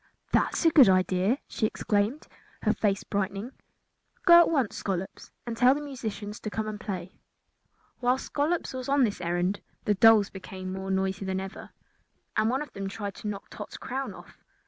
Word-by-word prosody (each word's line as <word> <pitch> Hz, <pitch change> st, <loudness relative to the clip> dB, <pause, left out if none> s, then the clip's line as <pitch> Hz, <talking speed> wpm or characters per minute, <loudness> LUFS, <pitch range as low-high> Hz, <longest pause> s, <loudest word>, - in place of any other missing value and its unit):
"That -, -, +2 dB
is -, -, -1 dB
a 330 Hz, -, +7 dB
good 270 Hz, -9 st, +8 dB
idea," 185 Hz, +5 st, +2 dB
she 220 Hz, -, 0 dB
exclaimed, 210 Hz, +7 st, -1 dB, 0.4 s
her -, -, +3 dB
face 200 Hz, -2 st, 0 dB
brightening. 200 Hz, +4 st, -3 dB, 0.7 s
"Go 345 Hz, -2 st, +10 dB
at 345 Hz, -, +5 dB
once, 275 Hz, -9 st, +1 dB
Scollops 190 Hz, -1 st, -4 dB, 0.2 s
and 235 Hz, -1 st, -4 dB
tell 250 Hz, +3 st, +5 dB
the 295 Hz, -, -4 dB
musicians 220 Hz, -7 st, -6 dB
to 215 Hz, -, -5 dB
come 215 Hz, +1 st, -3 dB
and 215 Hz, -1 st, -5 dB
play." 185 Hz, -3 st, -6 dB, 0.8 s
While 250 Hz, +1 st, +2 dB
Scollops 300 Hz, +5 st, -1 dB
was 255 Hz, 0 st, -5 dB
on 280 Hz, -1 st, +4 dB
this 205 Hz, -6 st, 0 dB
errand 175 Hz, +3 st, -1 dB, 0.2 s
the 210 Hz, -, +3 dB
dolls 210 Hz, 0 st, +6 dB
became 185 Hz, -1 st, -7 dB
more 190 Hz, 0 st, -5 dB
noisy 190 Hz, 0 st, 0 dB
than 190 Hz, 0 st, -1 dB
ever, 190 Hz, 0 st, -7 dB, 0.7 s
and 215 Hz, +1 st, +2 dB
one 265 Hz, +4 st, 0 dB
of 300 Hz, -, -14 dB
them 195 Hz, -1 st, -4 dB
tried 200 Hz, 0 st, -5 dB
to 215 Hz, -, -6 dB
knock 200 Hz, -1 st, -6 dB
Tot's -, -, -8 dB
crown 270 Hz, +1 st, -4 dB
off. -, -, -15 dB
210 Hz, 185 wpm, -28 LUFS, 190-255 Hz, 0.8 s, Go